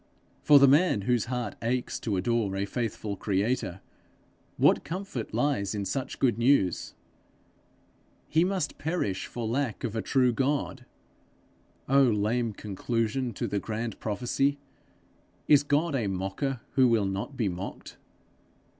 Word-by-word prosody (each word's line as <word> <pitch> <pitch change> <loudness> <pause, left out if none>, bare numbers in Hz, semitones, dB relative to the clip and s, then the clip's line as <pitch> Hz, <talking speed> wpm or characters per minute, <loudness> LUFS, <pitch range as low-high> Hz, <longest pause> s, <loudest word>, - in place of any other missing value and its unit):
For 145 - +7
the 140 0 +7
man 145 - +4
whose 120 +1 +1
heart 125 0 -3
aches 120 +2 -1
to 105 -4 -2
adore 105 0 0
a 100 +1 -1
faithful 105 -1 -3
creator, 100 -1 -1 0.8
what - - +4
comfort 180 - -5
lies 110 -4 0
in 100 -1 -2
such 135 +5 -3
good 120 -4 +1
news! 120 -8 +2 1.3
He 160 +2 +3
must 185 -4 -2
perish 155 - -2
for 120 -2 -5
lack 120 -1 -2
of 115 -3 -3
a 110 - 0
true 125 0 +2
God! 135 0 -1 1.0
Oh 140 +1 +5
lame 115 +1 +1
conclusion 115 +5 -2
to - - -3
the 100 - -1
grand 110 +1 -4
prophecy! 125 +6 0 0.9
Is 145 -1 +7
God 145 +3 +1
a 120 -6 0
mocker, 95 +7 -2
who 130 -2 +4
will 115 -4 +2
not 100 +8 -4
be 115 - +1
mocked? 90 +1 -6
120 Hz, 135 wpm, -28 LUFS, 105-135 Hz, 1.3 s, For